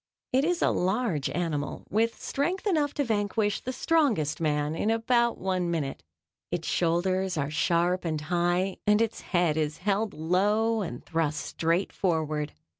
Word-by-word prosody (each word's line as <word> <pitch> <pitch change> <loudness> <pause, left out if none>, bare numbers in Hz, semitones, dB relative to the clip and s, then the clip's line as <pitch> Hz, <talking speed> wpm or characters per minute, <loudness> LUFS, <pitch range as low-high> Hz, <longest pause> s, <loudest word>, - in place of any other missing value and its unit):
It 265 +2 +4
is 345 +2 +1
a - - +4
large 185 - 0
animal 155 -5 -3
with 225 +3 +1
strength 350 +9 -2
enough 310 -8 +2
to 290 - +1
vanquish 210 -2 0
the 255 - -4
strongest 240 - +1
man 150 -1 0
in 185 +6 -1
about 235 +1 +2
one 185 -2 -1
minute. 150 -5 -2 0.5
Its 175 -1 -3
shoulders 185 +2 +1
are 140 0 -1
sharp 170 +4 +1
and 160 -3 -1
high, 175 +3 0
and 210 0 +5
its 230 -1 0
head 175 -4 +1
is 150 -1 -1
held 205 +2 -1
low 210 +7 +2
and 145 -10 -6
thrust 160 -3 -1
straight 170 +4 0
forward. 155 -4 -1
180 Hz, 155 wpm, -28 LUFS, 160-225 Hz, 0.5 s, and